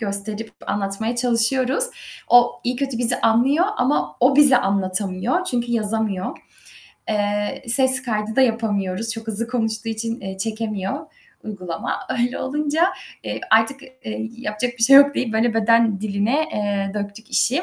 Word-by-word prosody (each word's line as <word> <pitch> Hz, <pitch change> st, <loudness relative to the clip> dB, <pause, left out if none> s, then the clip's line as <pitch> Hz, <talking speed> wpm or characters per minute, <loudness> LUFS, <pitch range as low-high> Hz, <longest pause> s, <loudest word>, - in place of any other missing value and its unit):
gösterip 210 Hz, +1 st, -3 dB
anlatmaya 205 Hz, +4 st, -2 dB
çalışıyoruz. 250 Hz, -, +2 dB, 0.4 s
O, 245 Hz, 0 st, +5 dB
iyi 245 Hz, +1 st, -1 dB
kötü 270 Hz, -2 st, -3 dB
bizi 245 Hz, 0 st, +2 dB
anlıyor 265 Hz, +10 st, +3 dB
ama 150 Hz, -, 0 dB
o 270 Hz, +3 st, +4 dB
bize 285 Hz, -3 st, +8 dB
anlatamıyor 195 Hz, -, -1 dB
çünkü 240 Hz, -7 st, -2 dB
yazamıyor. 215 Hz, -4 st, -2 dB, 0.7 s
Eee, 205 Hz, +5 st, -2 dB
ses 260 Hz, +1 st, +5 dB
kaydı 220 Hz, -2 st, -3 dB
da -, -, +4 dB
yapamıyoruz, 225 Hz, -3 st, 0 dB
çok 225 Hz, 0 st, -2 dB
hızlı 225 Hz, +1 st, -2 dB
konuştuğu 225 Hz, -2 st, -2 dB
için, 230 Hz, +2 st, -4 dB
eee, 190 Hz, 0 st, -7 dB
çekemiyor 215 Hz, -2 st, -4 dB, 0.4 s
uygulama. 185 Hz, -6 st, -5 dB, 0.2 s
Öyle 245 Hz, +2 st, -1 dB
olunca, 300 Hz, +4 st, 0 dB, 0.4 s
eee, -, -, -5 dB
artık 225 Hz, +5 st, +3 dB, 0.6 s
yapacak 225 Hz, +1 st, -3 dB
bir -, -, -1 dB
şey 270 Hz, +4 st, +8 dB
yok 285 Hz, 0 st, +6 dB
deyip, 235 Hz, -3 st, -2 dB
böyle, 225 Hz, +1 st, +1 dB
beden 225 Hz, -2 st, +2 dB
diline, 215 Hz, +8 st, 0 dB
eee, 200 Hz, -2 st, -2 dB
döktük 205 Hz, +1 st, -6 dB
işi. 275 Hz, +9 st, +2 dB
225 Hz, 140 wpm, -21 LUFS, 205-250 Hz, 0.7 s, bize